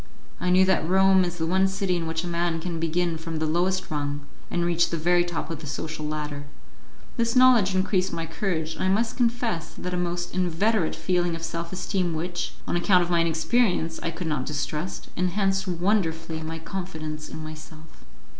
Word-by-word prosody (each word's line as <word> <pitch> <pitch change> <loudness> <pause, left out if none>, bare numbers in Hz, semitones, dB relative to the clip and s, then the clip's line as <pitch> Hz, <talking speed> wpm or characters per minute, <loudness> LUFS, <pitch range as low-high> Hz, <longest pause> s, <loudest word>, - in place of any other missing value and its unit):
I 180 - 0
knew 185 +1 +6
that 185 -4 +2
Rome 190 0 +5
is 175 -1 -3
the 160 - -1
one 190 +3 +3
city 190 -1 0
in 165 -2 -2
which 160 +1 -2
a - - -4
man 170 -1 0
can 170 0 -4
begin 165 0 0
from 165 0 -4
the 155 - 0
lowest 180 +4 0
rung, 145 -1 -2 0.3
and 175 0 0
reach 170 0 +2
the 170 - -2
very 175 +2 +3
top 175 -1 -4
of 165 - -4
the 155 - -8
social 155 +2 -4
ladder. 150 -1 -4 0.7
This 230 0 +1
knowledge 245 -7 +6
increased 185 0 +1
my 165 - -3
courage, 160 -2 -2
and - - -4
I - - +2
must 220 +4 +1
confess 235 -8 0
that 180 - -4
a - - 0
most 175 0 -2
inveterate 185 +1 +1
feeling 175 +1 0
of 165 - -7
self 165 +1 -4
esteem 180 -2 -1
which, 175 +2 -3
on - - 0
account 180 +1 +4
of 175 - -4
my 170 - +4
inexperience, 165 +1 +1
I - - -1
could 165 +2 -5
not 150 -5 -1
distrust, 150 +4 -3
enhanced 195 +2 +1
wonderfully 165 -3 0
my 160 +1 -4
confidence 160 -3 -5
in 155 - -7
myself. 155 0 -11
175 Hz, 195 wpm, -26 LUFS, 160-185 Hz, 0.7 s, knew